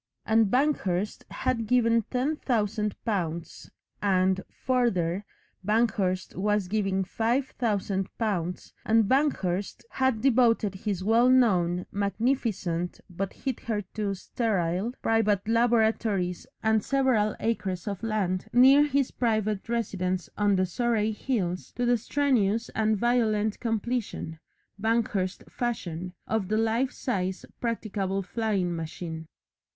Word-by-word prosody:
And 220 0 +4
Banghurst 210 -8 0
had 230 -3 -1
given 230 -1 +3
ten 270 +5 0
thousand 210 -5 -1
pounds, 170 -6 -3 0.3
and, 190 -1 +2
further, 205 -8 0 0.4
Banghurst 200 -3 0
was 205 0 0
giving 195 -1 0
five 235 +7 0
thousand 200 -4 0
pounds, 180 -6 -2
and 225 0 +4
Banghurst 205 -9 0
had 260 -4 +1
devoted 230 -5 +3
his 190 -1 -3
well 230 +4 +4
known, 180 -9 +3
magnificent 200 -5 -1
(but 190 +2 -3
hitherto 215 -5 -3
sterile) 190 -1 -1
private 215 -3 +2
laboratories 220 -5 +1 0.2
and 220 -1 +3
several 255 -6 +2
acres 195 -6 -2
of 200 -2 -3
land 210 -4 -1
near 265 +4 +7
his 280 -2 +1
private 215 -3 -1
residence 185 -6 -1
on 205 -1 +2
the 185 0 +2
Surrey 220 +3 0
hills 205 -6 -2
to 245 - -1
the 245 0 +4
strenuous 235 -3 +1
and 220 -1 +1
violent 220 -2 +1
completion 225 -7 -2 0.4
Banghurst 220 -4 0
fashion 180 -7 -4
of 220 -4 -1
the 215 - 0
life 225 +4 +1
size 190 -6 -3
practicable 200 -4 -2
flying 195 -4 -1
machine. 160 0 -6
215 Hz, 115 wpm, -27 LUFS, 190-235 Hz, 0.4 s, near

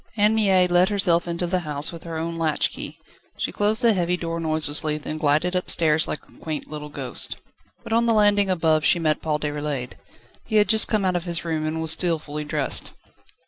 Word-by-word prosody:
Anne 210 +1 +4
Mie 195 -4 +4
let 175 +1 +3
herself 180 -5 +2
into 170 +1 -2
the 180 +1 0
house 150 -3 -1
with 170 -1 -10
her 165 -1 -5
own 165 +1 -3
latch 160 -2 0
key. - - -7 0.4
She - - -2
closed 210 +2 0
the 230 -2 +5
heavy 180 -2 0
door 165 -1 -4
noiselessly, 155 -1 0
then 155 +1 -6
glided 155 +4 +1
upstairs 160 -3 +2
like - - -5
a - - -21
quaint 155 -2 -5
little 150 0 -7
ghost. - - -1 0.5
But 230 -1 -4
on 235 +1 +3
the 230 - +3
landing 205 -2 +3
above 160 -4 +2
she - - +4
met 155 -2 0
Paul 155 -1 -1
Déroulède. 145 -4 -3 0.5
He 220 - -4
had 210 -1 +4
just 220 -1 +4
come 210 -3 0
out 185 -1 +1
of 175 0 -2
his 170 -1 -1
room, 155 -2 -2
and 160 +1 -3
was 160 - +4
still 170 0 +1
fully 150 0 -6
dressed. - - -2
170 Hz, 215 wpm, -23 LUFS, 155-185 Hz, 0.5 s, the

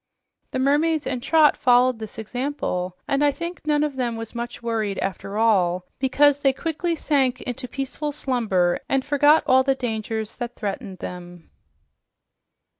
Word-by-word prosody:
The - - -3
mermaids 295 +3 +2
and 255 -2 -2
Trot 310 +3 +4
followed 245 -1 +3
this 220 0 -8
example, 220 -6 -3
and 275 +1 +1
I 290 - +4
think 335 +1 -7
none 300 -1 +3
of 290 -3 -2
them 240 -3 -1
was 225 -1 -7
much 235 0 -6
worried, 220 -4 -1
after 195 +2 -4
all, 185 -5 +2
because 280 +2 +3
they 275 -2 +3
quickly 330 +3 -2
sank 270 -5 +1
into 250 +1 -5
peaceful 275 +3 -4
slumber 220 -11 0
and 270 -1 +1
forgot 290 +2 +4
all 260 0 +5
the 270 0 +1
dangers 220 -3 -4
that 240 -1 -5
threatened 195 -2 -5
them. 175 -1 -10
255 Hz, 155 wpm, -23 LUFS, 220-285 Hz, -, all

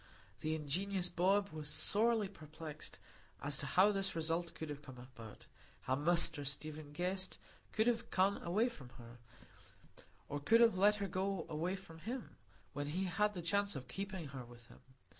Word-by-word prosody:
The 155 0 -1
ingenious 180 +5 0
Bob 195 +4 +3
was 155 -1 -5
sorely 220 +5 +3
perplexed 155 -4 -8 0.4
as 140 0 -2
to 145 - -3
how 185 +9 +5
this 195 -2 0
result 165 +1 0
could 160 - -5
have 145 0 -6
come 130 -3 -11
about; 115 -3 -11 0.4
how 130 - 0
Mr 155 0 +4
Stephen 150 +1 -5
Guest 185 +4 -1 0.3
could 220 - +2
have 235 -1 +1
gone 195 +2 +2
away 205 +8 +2
from 140 - -8
her, 120 -1 -12 1.1
or 145 - -3
could 225 +11 +5
have 230 -4 +6
let 205 +3 +5
her 200 -1 -2
go 190 -1 -1
away 165 +4 -1
from 175 -4 -11
him, 235 +8 -5 0.4
when 145 +1 -3
he 175 +6 -1
had 210 +3 +1
the 175 - -4
chance 200 +3 +1
of 130 -2 -6
keeping 190 +1 -5
her 130 -2 -6
with 120 -1 -14
him. - - -15
170 Hz, 175 wpm, -37 LUFS, 145-195 Hz, 1.1 s, have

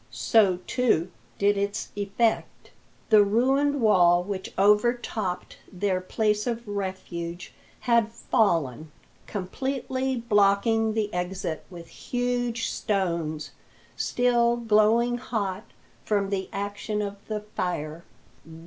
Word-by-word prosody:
So, 200 -5 +3
too, 205 -9 +1 0.3
did 200 0 +2
its 200 +1 -2
effect. 205 +3 -1 0.4
The 210 -1 +8
ruined 270 +7 +2
wall 175 -5 +5
which 190 0 -5
overtopped 210 -2 +1
their 185 -1 -1
place 210 +3 0
of 235 -1 -3
refuge 185 -3 -5 0.3
had 235 -2 +2
fallen, 160 - 0 0.4
completely 260 +6 -2
blocking 220 0 +2
the 210 -2 -1
exit 180 -2 -3
with 170 -2 -10
huge 245 -1 -2
stones, 170 -7 -2 0.4
still 240 -1 +2
glowing 230 +2 +3
hot 205 -4 -3 0.4
from 200 -2 0
the 190 -1 -2
action 205 +1 -3
of 200 0 -5
the 215 -1 -3
fire. 170 -4 -3
205 Hz, 105 wpm, -26 LUFS, 185-235 Hz, 0.4 s, The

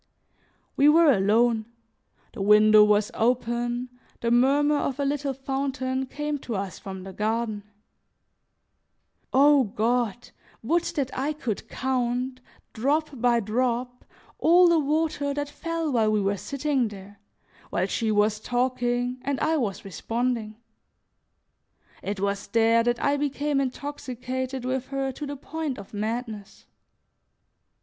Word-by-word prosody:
We 285 +2 +5
were 320 0 +6
alone, 220 +1 +2 0.7
the - - -6
window 210 +1 +7
was 210 0 +3
open, 240 +1 0 0.3
the 235 - 0
murmur 285 +5 +4
of 280 -1 -2
a 280 - +1
little 285 0 -1
fountain 265 -1 -2
came 295 +1 -3
to 235 -4 -5
us 195 -1 -4
from 190 -1 -8
the 190 0 -9
garden. 220 +1 -1 1.7
O 280 +1 +5
God! 235 +2 -1 0.3
would 335 +9 +2
that 270 -4 -2
I 280 +4 -1
could 240 -8 -4
count, 255 0 -1 0.3
drop 290 +7 0
by 240 -2 +2
drop, 245 +3 -1 0.4
all 350 +2 +6
the 340 -1 +4
water 295 -1 0
that 290 0 -2
fell 330 +1 -3
while 220 -4 +2
we 215 - +2
were 200 0 0
sitting 280 +2 -1
there, 200 -1 -11 0.5
while 180 - 0
she 220 +3 -1
was 210 0 +2
talking 245 +1 -1
and 270 0 -2
I 315 +1 +1
was 210 -9 -3
responding. 225 +2 -2 1.5
It 200 0 -4
was 200 0 -2
there 230 +2 +3
that 240 0 +1
I 285 0 +2
became 285 0 0
intoxicated 260 -1 -4
with 255 0 -2
her 270 -1 -2
to 290 +3 -7
the 285 0 -5
point 305 -1 -4
of 195 - -11
madness. 215 -1 -5
250 Hz, 130 wpm, -26 LUFS, 220-280 Hz, 1.7 s, window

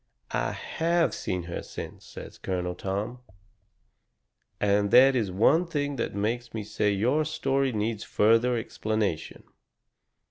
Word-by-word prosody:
"I - - -1
HAVE 170 +1 0
seen 90 -1 -3
her 85 0 -5
since," - - -8
says - - -10
Colonel 90 -1 -2
Tom, 100 +7 -4 1.4
"and 100 0 +2
that 130 +4 +7
is 110 -7 0
one 150 - +3
thing 145 -3 -2
that 115 - -2
makes 115 +3 -2
me 110 - -3
say 105 0 0
your 125 +10 +2
story 135 -3 0
needs 110 -1 -2
further 115 +3 +3
explanation." 110 -6 -2
110 Hz, 130 wpm, -27 LUFS, 100-135 Hz, 1.4 s, that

